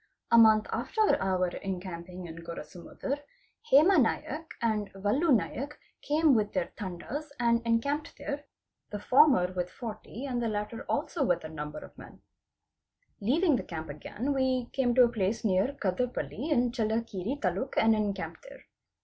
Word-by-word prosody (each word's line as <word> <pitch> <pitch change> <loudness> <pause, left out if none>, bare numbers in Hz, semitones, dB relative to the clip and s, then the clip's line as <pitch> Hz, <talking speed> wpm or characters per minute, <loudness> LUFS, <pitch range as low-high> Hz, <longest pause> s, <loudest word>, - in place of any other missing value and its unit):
A 235 - +7
month 220 -1 +6
after 435 -2 +2
our 185 -1 +1
encamping 180 -1 -6
in 165 -1 -9
Gorasa 165 0 -8
muddar, 280 +2 -4 0.5
Hema 320 +6 +7
Naik 305 +6 -2
and 215 -3 -1
Valu 210 - +1
Naik 275 +5 0 0.2
came 300 0 +3
with 210 -3 +1
their 185 -3 -1
Tandas 210 - -5
and 235 -1 +2
encampe 280 +6 +1
d - - -12
there, 290 +1 -5 0.4
the 210 - -4
former 250 -5 +4
with 180 -1 -2
40 225 +3 -7
and 250 -3 -2
the 235 - 0
latter 210 +1 -4
also 320 - 0
with 175 -8 +1
that 155 - -8
number 150 -1 -6
of - - -17
me - - -12 1.0
Leaving 290 - +3
the - - -4
camp 160 -2 -6
again, 235 - -3
we 260 -2 0
came 250 -3 +1
to 255 - +8
a - - +6
place 225 0 -1
near 195 +7 +2
Kadarpalli 210 - -2
in 245 -5 +2
Chelli 225 -1 0
kere 200 +7 -3
Taluk 195 +7 -2
and 225 0 +5
encamped 200 -3 -3
there. - - -13
225 Hz, 165 wpm, -29 LUFS, 185-265 Hz, 1.0 s, to